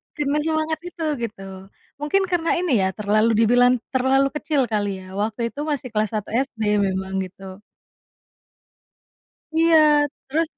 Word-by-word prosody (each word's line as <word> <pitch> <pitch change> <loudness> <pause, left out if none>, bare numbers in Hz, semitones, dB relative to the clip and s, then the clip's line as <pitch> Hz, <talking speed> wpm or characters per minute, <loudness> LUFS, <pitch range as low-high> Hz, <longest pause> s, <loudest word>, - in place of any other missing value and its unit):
karena 295 -1 0
semangat 315 0 0
itu 340 -2 -7 0.2
gitu, 210 -3 -10 0.6
mungkin 300 +7 +1
karena 340 -2 0
ini 355 -3 -1
ya - - +2
terlalu 215 +3 +1
dibilang 245 +2 +5 0.2
terlalu 265 +1 +2
kecil 300 -1 0
kali 205 -3 -2
ya - - -12
waktu 215 +2 -2
itu 285 - -11
masih 285 -4 -3
kelas 215 -2 0
1 210 -2 -3
SD 245 0 -2 0.2
memang 190 0 -3
gitu. 190 0 -11 2.0
Iya 325 +1 +4 0.5
terus, 315 +4 0
250 Hz, 135 wpm, -22 LUFS, 210-310 Hz, 2.0 s, dibilang